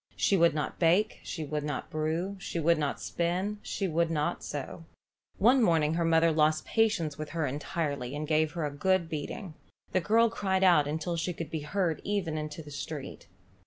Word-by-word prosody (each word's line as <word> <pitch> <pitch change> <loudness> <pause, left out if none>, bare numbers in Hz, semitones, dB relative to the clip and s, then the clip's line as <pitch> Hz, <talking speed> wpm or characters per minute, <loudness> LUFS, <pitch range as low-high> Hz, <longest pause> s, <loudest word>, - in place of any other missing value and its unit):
She 200 - +2
would 170 -3 +4
not 150 - -3
bake, 180 +6 +3
she 160 -3 -5
would 150 0 -3
not 150 0 -4
brew, 160 +5 -1
she 170 - -4
would 165 0 +3
not 145 -2 -1
spin, 185 +5 -2
she 195 - -2
would 170 0 +1
not 150 -2 -1
sew. 150 +3 -6 0.5
One 250 +6 +5
morning 160 -7 +3
her 170 +1 0
mother 165 0 +4
lost 155 0 +2
patience 170 -10 +1
with 155 - -4
her 160 - +1
entirely, 145 -1 -3
and 150 +1 -4
gave 155 0 +2
her 165 -3 -2
a 145 - -2
good 185 +3 +1
beating. 160 +4 -5 0.4
The 185 - +2
girl 225 +5 +3
cried 190 -3 0
out 170 -6 +5
until 160 +3 -2
she 175 +2 -1
could 165 -1 -6
be 160 - -2
heard 165 +2 -1
even 195 -6 -1
into 155 +1 -5
the 150 - -11
street. 140 0 -6
165 Hz, 195 wpm, -29 LUFS, 150-185 Hz, 0.5 s, One